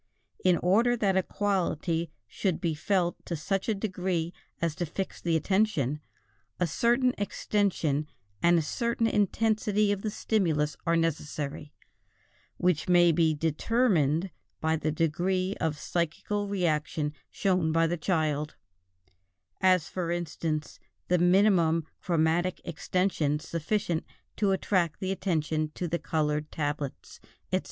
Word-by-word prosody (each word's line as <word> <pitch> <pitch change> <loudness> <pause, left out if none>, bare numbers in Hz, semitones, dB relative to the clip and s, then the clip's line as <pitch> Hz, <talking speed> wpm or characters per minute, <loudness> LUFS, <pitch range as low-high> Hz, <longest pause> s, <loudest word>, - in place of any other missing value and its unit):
In 180 -2 +4
order 230 +7 +4
that 200 -4 +1
a 190 - +4
quality 175 -4 -1 0.2
should 185 - -1
be 170 -4 0
felt 175 +3 0
to 170 - -2
such 195 +7 -2
a 220 - +2
degree 185 -4 -2 0.3
as 165 -2 0
to 175 - -1
fix 190 +5 -5
the 170 -2 +1
attention, 160 - +1 0.6
a 180 - +3
certain 240 - +2
extension 185 -8 0 0.3
and 175 0 +5
a 165 - +2
certain 235 +8 -1
intensity 210 0 +2
of 200 -1 -1
the 215 - -2
stimulus 165 -9 0
are 170 - +4
necessary, 150 -2 -2 0.9
which 180 -2 +1
may 175 -1 +6
be 160 -1 +2
determined 165 - +1 0.3
by 160 0 +1
the 155 0 -1
degree 180 +5 0
of 155 -2 0
psychical 175 +6 -2
reaction 155 -5 -1 0.2
shown 180 -5 +1
by 165 +1 +3
the 170 +1 0
child; 155 -3 -1 1.1
as, 185 -4 +4
for 180 -3 -3
instance, 160 -2 -3 0.3
the 180 0 +3
minimum 175 -3 +4 0.2
chromatic 170 +1 +1
extension 170 -3 0
sufficient 170 +2 -1 0.3
to 205 -2 +1
attract 185 -4 +1
the 190 0 -2
attention 155 -5 -1
to 180 - -2
the 170 +1 -1
colored 150 -1 -1
tablets, 145 -2 -4 0.3
etc. - - +3
175 Hz, 130 wpm, -28 LUFS, 155-195 Hz, 1.1 s, may